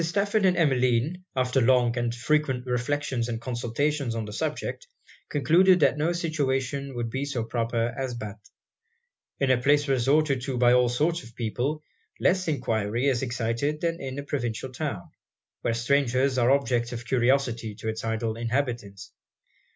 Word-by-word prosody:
Stafford 200 +4 +1
and 180 -2 +2
Emmeline, 135 +3 +1
after 130 0 +1
long 120 -1 +3
and 120 -1 -1
frequent 130 0 0
reflections 125 -1 -1
and 115 -1 -3
consultations 125 +2 -1
on 110 -1 -3
the 105 - -8
subject, 155 - -3 0.4
concluded 170 +6 +4
that 140 -2 +4
no 155 +3 0
situation 140 -5 -1
would 120 -1 -3
be 135 +3 -2
so 140 -5 -2
proper 115 0 -1
as 130 -2 -3
Bath. 105 -2 -8 0.9
In 135 -2 +2
a 125 -1 +2
place 145 +2 +3
resorted 135 +1 +2
to 130 -1 -3
by 120 0 +5
all 125 -1 +4
sorts 155 +8 0
of 115 -1 -14
people, 125 +7 -2 0.4
less 185 0 +2
enquiry 115 -5 -1
is 125 -3 0
excited 125 +4 -1
than 170 0 -1
in 135 0 -5
a 140 - -4
provincial 130 -3 -3
town, 125 - -5 0.5
where 115 - 0
strangers 130 +1 +2
are 120 0 +3
objects 125 -4 +1
of 120 0 -6
curiosity 120 -3 +1
to 110 +1 -7
it's 110 0 -3
idle 115 0 -2
inhabitants. 115 -6 -3
130 Hz, 160 wpm, -26 LUFS, 120-145 Hz, 0.9 s, by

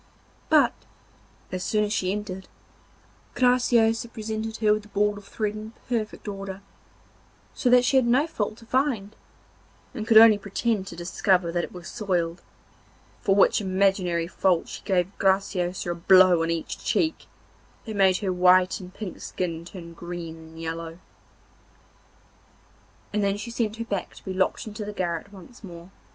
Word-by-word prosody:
But, 295 -6 +5 0.8
as 185 0 -3
soon 210 +2 +1
as 210 0 -1
she 185 -3 0
entered, 195 -2 -5 0.9
Graciosa 240 -2 +3
presented 220 0 -4
her 215 -1 +3
with 215 - -1
the 210 - -16
ball 205 0 +1
of 205 -1 -11
thread 210 -2 -2
in 215 +1 -8
perfect 225 -3 -3
order, 195 -1 -6 0.9
so 250 - 0
that 250 0 +6
she 265 - +3
had 255 -2 +3
no 255 +5 +4
fault 220 -9 -3
to 230 - -15
find, 235 -5 -1 0.8
and 220 -4 -5
could 225 -2 +6
only 220 -2 +8
pretend 200 0 -1
to 175 - -8
discover 180 0 +1
that 175 0 -1
it - - -6
was 180 -1 -10
soiled, 180 -6 -2 0.8
for 195 - +2
which 200 - +4
imaginary 185 -3 +1
fault 180 0 +1
she - - -7
gave 190 -1 0
Graciosa 190 -2 0
a - - 0
blow 180 0 +5
on 165 - 0
each 165 -1 -3
cheek, 320 -3 0 0.6
that 220 - -5
made 190 -2 +4
her 190 -3 0
white 180 +2 +4
and 180 -1 -10
pink 195 -1 -8
skin 170 -3 -4
turn 170 -2 -10
green 170 -1 -7
and 160 0 -13
yellow. 165 0 -5 2.2
And 210 0 +1
then 200 0 +1
she 225 +3 -6
sent 225 -2 -1
her 230 0 -5
back 200 -4 -4
to - - -15
be 190 - -4
locked 185 0 0
into 215 0 -6
the 210 0 -6
garret 175 0 -3
once 205 +5 -14
more. 175 -1 -11
195 Hz, 165 wpm, -25 LUFS, 180-220 Hz, 2.2 s, only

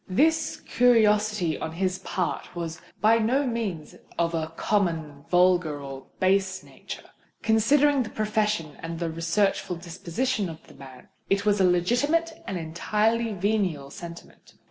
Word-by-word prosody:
This 320 +11 +2
curiosity 210 -7 +3
on 160 - -4
his 185 +1 -1
part 185 -1 -3
was 170 -1 -5 0.2
by 225 +2 +5
no 255 +6 +2
means 215 - -3 0.2
of 170 0 +1
a 160 -1 -1
common, 160 -8 -1
vulgar, 175 -4 +3
or 135 -1 -8
base 190 0 +2
nature. - - -10 0.4
Considering 275 +6 +4
the 225 - -3
profession 210 -7 -1
and 165 0 -5
researchful 170 +3 0
disposition 185 +5 -2
of 160 -1 -10
the - - -16
man, 130 -2 -13 0.2
it 200 +1 +1
was 205 -1 +3
a 185 - +5
legitimate 285 - +2
and 190 - -2
entirely 215 +7 0
venial 185 -8 -1
sentiment. 170 +1 -11
190 Hz, 135 wpm, -26 LUFS, 165-220 Hz, 0.4 s, by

